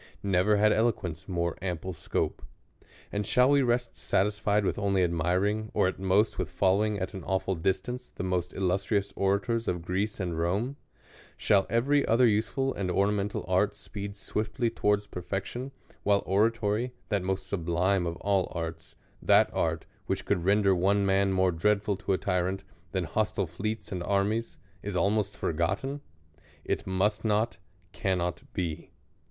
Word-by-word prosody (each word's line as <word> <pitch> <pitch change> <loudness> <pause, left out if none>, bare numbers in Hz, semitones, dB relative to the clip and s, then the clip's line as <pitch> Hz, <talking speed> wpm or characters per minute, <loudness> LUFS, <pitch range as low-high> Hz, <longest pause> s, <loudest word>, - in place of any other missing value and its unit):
Never 100 +2 +3
had 105 +1 +4
eloquence 100 -8 -1
more 85 -2 -1
ample 90 0 -3
scope. 80 - -2 0.7
And 105 0 -1
shall 125 +6 +4
we 140 -1 +5
rest 120 -1 0
satisfied 105 +1 +1
with - - 0
only 100 -2 +2
admiring, 90 +6 0
or - - +4
*at 95 - -3
most 95 +3 +2
with 90 -4 -1
following 100 +4 +2
at 95 -1 -4
an 95 -3 -7
awful 95 +1 0
distance, 110 +9 -2
the - - -6
most 90 -1 -1
illustrious 100 +2 0
orators 100 +4 0
of 90 -2 -1
Greece 100 +4 -1
and 85 -4 -2
Rome? 100 +11 0 0.6
Shall 100 -2 +3
every 135 +6 +3
•ther 120 0 +4
useful 115 +5 +1
and 95 -2 -3
ornamental 100 +2 0
art - - +2
speed 100 0 -7
swifdy 110 +3 -2
towards 105 -1 +1
perfection, 95 +8 -5 0.3
while 100 -1 +2
oratory, 110 +3 +1 0.2
that 100 -2 +1
most 95 +1 -2
sublime 90 +1 0
of 85 - -3
all 100 0 0
arts; 80 -1 -5 0.3
that - - +5
art, - - -1 0.2
which 95 0 -2
could 90 -4 0
render 100 +1 +4
one 100 +3 +2
man 95 0 +3
more 95 -1 +3
dreadful 100 +4 +1
to 95 - -1
a - - +2
tyrant, 95 0 -1 0.3
than 95 -2 0
hostile 100 +3 0
fleets 105 +6 -4
and 90 -2 -3
armies, 100 +5 0 0.2
is 100 -2 -4
almost 100 +3 +1
forgotten? 95 - -1 0.6
It - - -2
must 100 +3 +1
not, 110 0 +1 0.3
cannot 90 -3 -1
be. 85 -4 -3
100 Hz, 155 wpm, -28 LUFS, 90-105 Hz, 0.7 s, we